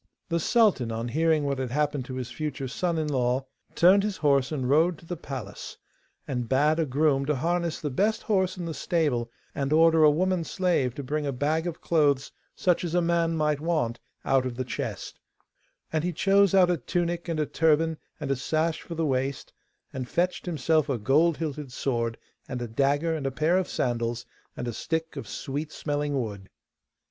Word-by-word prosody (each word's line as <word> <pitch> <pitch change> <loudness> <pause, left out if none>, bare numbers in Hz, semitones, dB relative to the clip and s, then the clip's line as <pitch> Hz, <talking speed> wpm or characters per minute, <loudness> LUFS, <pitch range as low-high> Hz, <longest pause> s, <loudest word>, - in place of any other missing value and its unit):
The 170 0 +1
sultan, 190 - +3
on 115 +2 -3
hearing 160 +2 +2
what 140 -1 -1
had 130 -2 -2
happened 145 0 0
to 130 - -6
his 125 -2 -5
future 145 0 -4
son 170 +6 -1
in 155 -1 -1
law, 130 -1 0 0.3
turned 185 +4 +6
his 205 -1 -2
horse 140 -3 +2
and 135 -5 -2
rode 160 +5 +3
to 165 - -16
the 175 - -4
palace, 135 -5 -7 0.5
and 125 -3 -3
bade 150 +4 +3
a 160 - +1
groom 140 0 +2
to 150 - +2
harness 170 +3 -1
the 150 - -3
best 210 +11 +1
horse 190 -4 +1
in 175 - -4
the 165 - -3
stable 145 -9 0 0.2
and 140 0 -2
order 160 0 +5
a 155 - +8
woman 180 +3 +1
slave 165 -9 0
to 140 - -5
bring 145 +2 -2
a - - 0
bag 150 +6 0
of 170 - -5
clothes, 145 -4 +2 0.2
such 180 -1 +1
as 170 -1 -2
a 175 - +4
man 170 -1 +1
might 150 -2 +1
want, 150 -8 -1 0.3
out 135 -1 +3
of 125 - -5
the 130 - -2
chest; - - -5 0.7
and 155 -1 +1
he 180 - 0
chose 195 +3 +3
out 180 -2 +6
a 175 - +1
tunic 170 +4 -2
and 165 -2 -1
a 150 - +2
turban 160 +1 +2 0.2
and 145 -3 -3
a - - +2
sash 155 +5 -1
for 170 - -7
the 165 0 0
waist, 135 -1 -2 0.4
and 130 -2 -5
fetched 180 +1 -1
himself 155 -1 +1
a 135 - +1
gold 150 +9 +3
hilted 150 -4 -4
sword, 115 -3 -1 0.3
and 125 -2 -3
a 120 - -4
dagger 140 +7 +1
and 140 -3 -2
a - - -1
pair 155 +6 +1
of 185 -1 +1
sandals, 120 -1 -1 0.3
and 120 - -4
a 120 - -3
stick 160 +6 -3
of - - -6
sweet 145 +2 -4
smelling 145 -1 -2
wood. 100 -5 -5
150 Hz, 200 wpm, -27 LUFS, 130-170 Hz, 0.7 s, a